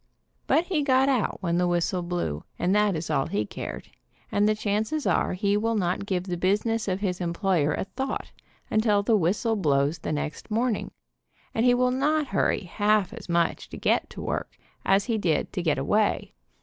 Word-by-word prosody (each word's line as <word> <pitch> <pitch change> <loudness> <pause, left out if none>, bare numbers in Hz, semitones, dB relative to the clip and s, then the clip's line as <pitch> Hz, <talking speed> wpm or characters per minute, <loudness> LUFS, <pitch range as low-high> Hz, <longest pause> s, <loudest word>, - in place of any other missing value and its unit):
But 325 - +4
he 345 -5 0
got 265 -1 +3
out 250 -6 0
when 170 -1 +1
the 180 - +2
whistle 175 +1 0
blew, 175 - -3
and 180 +2 +1
that 210 -2 +3
is 160 +1 -3
all 135 - +1
he 105 +1 -1
cared, - - -7 0.4
and 205 +1 +3
the 215 - +2
chances 215 +8 -1
are - - +2
he 200 +2 +1
will 225 +2 +1
not 190 0 -1
give 185 -3 0
the 180 -2 -3
business 210 +5 +1
of 190 0 -1
his 185 -3 -1
employer 170 -3 +1
a - - -2
thought 265 +7 -4 0.4
until 215 -2 +3
the 225 +1 +3
whistle 210 +5 +1
blows 145 -4 +1
the - - -4
next 150 +4 -4
morning, 225 +1 0 0.6
and 225 +3 +2
he 245 - +5
will 250 0 +2
not 295 +4 +1
hurry 195 - +1
half 205 +2 +1
as 230 -6 -10
much 170 -1 0
to - - -8
get - - +1
to - - -8
work - - -4 0.3
as 195 +1 +3
he 225 -3 0
did 165 -6 0
to 185 - -1
get 155 -4 +1
away. 205 +10 +1
200 Hz, 195 wpm, -26 LUFS, 175-225 Hz, 0.6 s, he